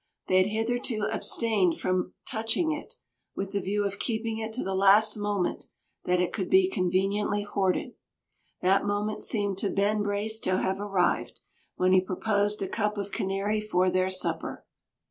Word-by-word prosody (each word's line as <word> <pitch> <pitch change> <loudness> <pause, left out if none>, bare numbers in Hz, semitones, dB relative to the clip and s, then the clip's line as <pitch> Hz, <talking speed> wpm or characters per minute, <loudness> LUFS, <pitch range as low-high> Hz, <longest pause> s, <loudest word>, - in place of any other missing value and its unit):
They 185 - +2
had 185 +1 +4
hitherto 225 0 -1
abstained 205 -7 +1
from 185 0 -1
touching 230 +7 0
it, 310 +10 -6 0.4
with 195 0 -4
the 200 0 -1
view 205 +2 -1
of 200 0 -3
keeping 225 -1 -2
it 220 0 -4
to 255 - -2
the 190 - -2
last 200 +3 +5
moment 205 -3 -2 0.4
that 180 0 +2
it 180 - 0
could 190 - -2
be 375 0 +4
conveniently 200 +2 0
hoarded. 195 -2 -1 0.7
That 195 +2 +4
moment 205 +1 -2
seemed 200 -3 0
to 200 - 0
Ben 205 +2 +1
Brace 205 +2 -1
to 185 -2 0
have 190 +1 -1
arrived, 195 -3 0 0.4
when 185 0 +2
he 185 - +6
proposed 205 +2 0
a - - -2
cup 210 +1 -1
of 200 0 -4
Canary 195 +3 -1
for 185 -3 +1
their 185 +1 +1
supper. 185 - -2
205 Hz, 165 wpm, -27 LUFS, 190-215 Hz, 0.7 s, he